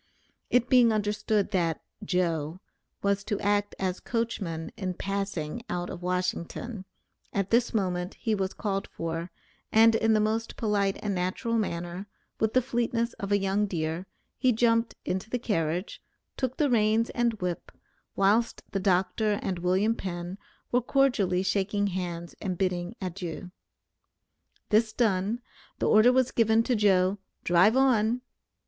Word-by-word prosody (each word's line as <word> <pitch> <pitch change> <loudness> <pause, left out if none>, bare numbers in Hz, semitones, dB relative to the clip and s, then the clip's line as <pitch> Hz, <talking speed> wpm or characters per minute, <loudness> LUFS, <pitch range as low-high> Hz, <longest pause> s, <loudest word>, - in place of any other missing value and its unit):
It 245 -1 +3
being 245 -3 +6
understood 210 -1 0
that 170 -5 0 0.2
"Joe" 170 -4 -1 0.4
was 200 0 +1
to 205 -2 -2
act 205 0 +1
as 185 -1 -2
coachman 200 -9 -3
in 185 -4 -3
passing 195 -2 -3
out 175 0 -3
of 175 - -7
Washington, 180 +4 -3 0.5
at 200 -1 -1
this 235 +1 +3
moment 180 -3 -1
he 225 -3 -1
was 195 -2 -1
called 195 -2 -2
for, 165 +1 -4 0.4
and 225 +1 +6
in 225 0 +3
the 215 - +4
most 220 +2 -1
polite 205 -3 +1
and 205 -2 0
natural 185 +6 -2
manner, 175 -2 -2 0.3
with 220 0 +1
the 255 - +4
fleetness 235 -1 -1
of 200 0 -4
a 205 - +5
young 200 +1 +1
deer, 165 0 -3 0.3
he 255 - +4
jumped 230 0 +2
into 190 +4 -2
the 245 - 0
carriage, 180 -6 -2 0.3
took 260 -1 -2
the 300 - +3
reins 220 0 +3
and 240 -1 +1
whip, 180 -4 -4 0.4
whilst 210 +4 +2
the 195 - -1
doctor 195 +3 +2
and 185 -2 -2
William 190 +5 +2
Penn 180 -2 -5 0.3
were 245 - +3
cordially 230 -9 +2
shaking 200 +1 0
hands 175 -2 -4
and 185 -3 -2
bidding 180 +2 -1
adieu. 180 -1 -5 1.2
This 215 +1 +3
done, 215 0 +1 0.4
the - - 0
order 215 +3 +6
was 260 0 +2
given 225 0 +3
to 250 +1 +1
Joe, 195 -2 +3 0.2
"drive 185 +8 +4
on." 245 -3 +3
200 Hz, 145 wpm, -28 LUFS, 180-225 Hz, 1.2 s, being